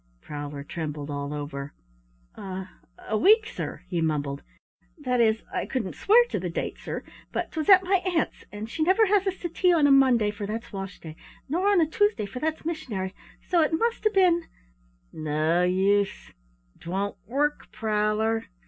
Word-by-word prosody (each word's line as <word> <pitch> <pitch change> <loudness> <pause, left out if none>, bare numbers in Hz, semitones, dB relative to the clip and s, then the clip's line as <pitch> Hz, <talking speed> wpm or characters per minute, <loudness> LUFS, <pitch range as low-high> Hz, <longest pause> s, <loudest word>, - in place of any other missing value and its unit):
Prowler 145 - -6
trembled 150 -1 -5
all 140 0 -4
over. 145 -1 -6 0.6
"A 190 -1 -6 0.4
a 220 - -1
week, 430 - +5
sir," - - -6
he 175 -2 -1
mumbled, 145 -3 -1 0.6
"that 250 -5 0
is, 220 -1 +2
I - - -2
couldn't 235 -8 -2
swear 470 +4 +5
to - - -2
the - - -3
date, - - -4
sir, - - -5 0.3
but - - -3
'twas 315 +3 -3
at 380 -1 +8
my 380 +1 +3
aunt's 360 -3 -1
and 210 +1 -6
she 315 - -5
never 375 +7 +4
has 405 -1 +2
us 380 0 -1
to 345 - -1
tea 360 +2 +2
on 320 -4 +4
a 285 - +5
Monday, 255 -6 +5
for 205 -1 -6
that's 225 +2 -5
wash 195 -1 -6
day, 160 -1 -9 0.3
nor 355 +8 0
on 405 -3 +5
a - - +4
Tuesday, 415 - +1
for 200 +5 -7
that's 315 +1 -2
missionary, 220 - -3 0.3
so 350 -2 +3
it 310 +1 +1
must 465 +5 0
'a' 430 - +4
been 360 -5 +3 0.4
" - - -37
"No 155 +3 +1
use, 195 +2 +1 0.5
't 170 - -10
won't 200 +2 -2
work, 290 +5 -1
Prowler." 215 +1 0
220 Hz, 185 wpm, -26 LUFS, -, 0.6 s, at